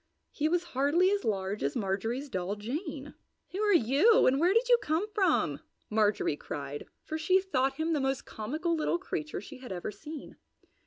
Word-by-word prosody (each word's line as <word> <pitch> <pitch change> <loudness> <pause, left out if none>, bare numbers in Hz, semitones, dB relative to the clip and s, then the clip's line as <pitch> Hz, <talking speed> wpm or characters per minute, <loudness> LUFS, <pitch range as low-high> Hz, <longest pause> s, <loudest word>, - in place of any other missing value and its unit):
He 305 +1 0
was 350 +1 +1
hardly 295 +8 +3
as 405 0 0
large 195 -1 -1
as 140 +1 -1
Marjorie's 225 +7 -1
doll, 190 -4 -2
Jane. 285 - -5 0.4
"Who 380 - -4
are 420 -1 +3
you, 325 - +5
and 270 +2 +4
where 345 +4 +4
did 460 +4 +3
you 485 -1 +6
come 320 +7 0
from?" 395 -4 +2 0.3
Marjorie 210 -7 +2
cried, 145 0 -6 0.2
for 315 - -4
she 370 +4 +4
thought 270 -9 0
him 320 +1 0
the 300 - +1
most 270 0 -1
comical 310 +11 -2
little 320 +2 +1
creature 345 -4 -4
she 275 -3 -11
had 255 -5 -9
ever 180 +2 -4
seen. 300 +9 -9
290 Hz, 180 wpm, -30 LUFS, 215-345 Hz, 0.4 s, you